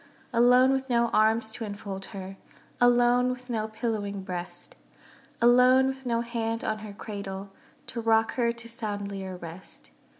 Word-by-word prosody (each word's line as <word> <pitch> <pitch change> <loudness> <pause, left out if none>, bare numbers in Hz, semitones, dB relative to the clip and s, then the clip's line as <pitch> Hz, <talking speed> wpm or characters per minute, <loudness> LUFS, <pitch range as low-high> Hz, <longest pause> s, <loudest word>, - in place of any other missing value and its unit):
Alone 250 +2 +6
with 265 0 -1
no 235 -1 +3
arms 220 0 +2
to 225 - -5
enfold 200 -2 -6
her, 195 -2 -8 0.4
Alone 245 0 +4
with 250 0 -5
no 220 -2 -1
pillowing 215 -3 -3
breast, 180 -1 -5 0.6
Alone 250 +2 +6
with 265 -1 -3
no 235 -1 +1
hand 230 -1 -2
on 215 0 -1
her 215 -1 -8
cradle, 200 -1 -6 0.3
To 235 - -5
rock 225 0 +3
her 235 -2 +1
to 235 0 -8
soundlier 200 -5 -5
rest. 170 - -9
225 Hz, 145 wpm, -27 LUFS, 200-245 Hz, 0.6 s, Alone